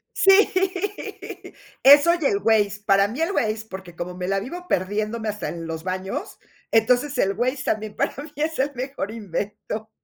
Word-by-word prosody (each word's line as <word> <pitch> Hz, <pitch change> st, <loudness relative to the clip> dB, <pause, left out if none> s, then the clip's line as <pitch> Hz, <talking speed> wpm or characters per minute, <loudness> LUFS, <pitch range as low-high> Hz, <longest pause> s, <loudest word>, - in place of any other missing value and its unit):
Sí, 390 Hz, +2 st, +5 dB, 1.3 s
eso 285 Hz, +5 st, +8 dB
y -, -, -3 dB
el 200 Hz, -, +2 dB
Waze, 205 Hz, -2 st, +2 dB
para 195 Hz, -1 st, +4 dB
mí 240 Hz, +8 st, -6 dB
el 340 Hz, -, 0 dB
Waze, 220 Hz, -, -1 dB
porque 190 Hz, -3 st, -9 dB
como 180 Hz, +1 st, -5 dB
me 180 Hz, 0 st, -4 dB
la 195 Hz, 0 st, +1 dB
vivo 350 Hz, -, -7 dB
perdiéndome 215 Hz, -, -1 dB
hasta 210 Hz, -, -5 dB
en 165 Hz, -1 st, -6 dB
los 160 Hz, 0 st, -5 dB
baños, 185 Hz, +1 st, -4 dB, 0.3 s
entonces 250 Hz, +6 st, +2 dB
el 195 Hz, -, +2 dB
Waze 255 Hz, +5 st, -1 dB
también 215 Hz, -1 st, -2 dB
para 280 Hz, +1 st, -1 dB
mí 300 Hz, -, -10 dB
es 310 Hz, +1 st, -2 dB
el 280 Hz, +2 st, +1 dB
mejor 255 Hz, -4 st, -4 dB
invento. 215 Hz, +1 st, -5 dB
215 Hz, 175 wpm, -23 LUFS, 195-270 Hz, 1.3 s, eso